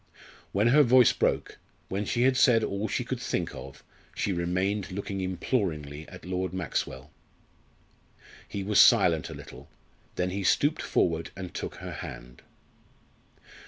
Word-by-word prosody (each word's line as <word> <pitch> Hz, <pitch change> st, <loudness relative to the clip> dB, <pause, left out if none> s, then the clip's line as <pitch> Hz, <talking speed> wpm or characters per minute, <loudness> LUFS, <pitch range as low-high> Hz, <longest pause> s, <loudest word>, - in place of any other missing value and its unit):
When 105 Hz, +4 st, +2 dB
her 150 Hz, +5 st, +6 dB
voice 125 Hz, -2 st, +6 dB
broke -, -, -1 dB, 0.3 s
when 100 Hz, +2 st, -2 dB
she 120 Hz, +4 st, 0 dB
had 130 Hz, 0 st, +4 dB
said 125 Hz, -3 st, +5 dB
all 100 Hz, +2 st, -2 dB
she -, -, -1 dB
could -, -, -4 dB
think -, -, -2 dB
of 70 Hz, 0 st, -10 dB, 0.3 s
she 100 Hz, -, -1 dB
remained 95 Hz, +3 st, -1 dB
looking 100 Hz, 0 st, -4 dB
imploringly 85 Hz, -, -2 dB
at 90 Hz, -, -12 dB
Lord 90 Hz, -1 st, -2 dB
Maxwell. 95 Hz, -, -3 dB, 1.4 s
He 100 Hz, -, -4 dB
was 105 Hz, +1 st, +2 dB
silent 80 Hz, -3 st, +5 dB
a -, -, -7 dB
little; -, -, -12 dB, 0.5 s
then 90 Hz, 0 st, -1 dB
he 100 Hz, +1 st, -3 dB
stooped 145 Hz, -, +2 dB
forward 85 Hz, -1 st, 0 dB
and 95 Hz, -2 st, -7 dB
took -, -, -5 dB
her -, -, -7 dB
hand. 60 Hz, +1 st, -9 dB
95 Hz, 145 wpm, -28 LUFS, 90-105 Hz, 1.4 s, her